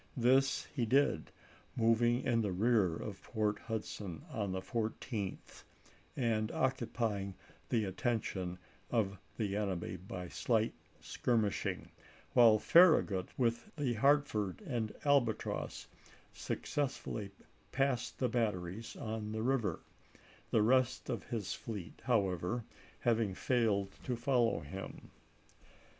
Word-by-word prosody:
This 130 +3 +3
he 120 -5 0
did, 130 - +2 0.5
moving 120 +1 +3
in 115 -2 +2
the 105 - 0
partL^1^! 90 -1 -4
rear 110 -4 +4
°f 105 - -5 0.2
^or^ 105 -1 +1
Hudson 105 -6 -5
on 100 -3 -2
the 95 - -1
14th, 110 0 -4 0.6
and 115 -3 +1
occupy 120 -5 0
ing 100 -1 -6 0.3
the 110 -3 +2
attention 95 -3 -2 0.3
of 100 -5 0 0.2
the 100 -3 -1
enemy 95 -3 -2
by 90 0 -7
slight 110 +4 +1 0.3
skir 120 -2 +1
mishing, 105 -2 -2 0.4
while 115 -3 +7
Farragut, 110 - +5
with 120 -2 0
the 140 -6 0
Hartford 110 -6 +2
and 115 -5 -2
Mar.i4,i863. - - -15
Albatross, 140 -6 +1 0.5
successfully 130 -7 -3 0.4
passed 135 -2 0
the 130 - +1
batteries 105 -3 -2
on 110 -1 -4
the 110 0 -2
river, 115 -9 0 0.7
the 110 - +3
rest 130 +2 +2
of 115 - -3
his 115 -5 -3
fleet, 105 -7 -7
however, 100 -1 +1 0.4
having 115 -5 +2
failed 105 -6 +1
to 125 - 0
follow 120 -1 +2
him. 95 +7 -8
110 Hz, 120 wpm, -34 LUFS, 100-120 Hz, 0.7 s, while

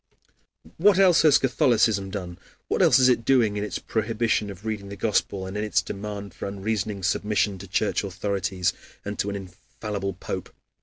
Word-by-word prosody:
What 195 +2 +5
else 185 -4 +6
has 150 -3 +6
Catholicism 115 -6 +2
done, 90 -3 -6 0.3
what - - +1
else 125 - +6
is 130 -1 +5
it 125 -2 +3
doing 115 -5 +3
in 105 - -2
its 105 - -3
prohibition 110 -1 -1
of 100 +2 -10
reading 105 -3 -4
the 100 - -6
Gospel, 100 -2 0
and 95 +1 -7
in 105 - -1
its 105 -4 +1
demand 100 -1 -6
for - - -6
unreasoning 100 0 -3
submission 105 0 0
to 100 - -9
Church 100 +1 0
authorities 95 -1 -1 0.3
and 105 0 -5
to 100 - 0
an 100 - -3
infallible 100 +1 -6
Pope? 90 - -6
105 Hz, 175 wpm, -25 LUFS, 100-110 Hz, 0.3 s, else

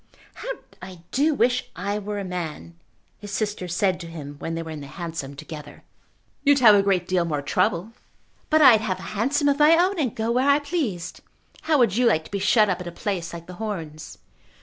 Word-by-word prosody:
"How - - -8 0.3
I 180 -3 -10
do 295 +3 +2
wish 245 0 +1
I 200 +3 -2
were 205 0 -5
a 200 - -3
man!" 175 -3 -5 0.5
his 205 - -9
sister 205 -2 -2
said 180 +1 0
to 170 - -8
him 150 -3 -8
when 165 - -4
they 165 - -3
were 160 - -8
in 155 -2 -7
the 140 - -8
hansom 160 -3 -6
together. 150 0 -10 0.6
"You'd 285 -1 +5
have 235 -5 +7
a 200 - +5
great 190 -3 +1
deal 185 -2 +2
more 150 -4 -2
trouble." 180 +5 0 0.6
"But 310 0 +5
I'd 235 -6 +8
have 195 -4 -2
a - - -10
hansom 275 +8 +1
of 285 0 +2
my 310 +2 +6
own, 365 +2 +2
and 255 -8 -1
go 225 +1 -1
where 255 +4 +2
I 280 - +6
pleased. 285 - -3 0.4
How 315 -2 +2
would 230 -6 +3
you 250 -1 +4
like 160 -8 +2
to - - -14
be 200 - -2
shut 210 +2 +4
up 185 -2 -1
at 180 - -7
a - - -5
place 175 -2 -3
like 170 -1 -8
The 180 - -10
Horns?" 165 -8 -6
195 Hz, 220 wpm, -24 LUFS, 170-245 Hz, 0.6 s, I'd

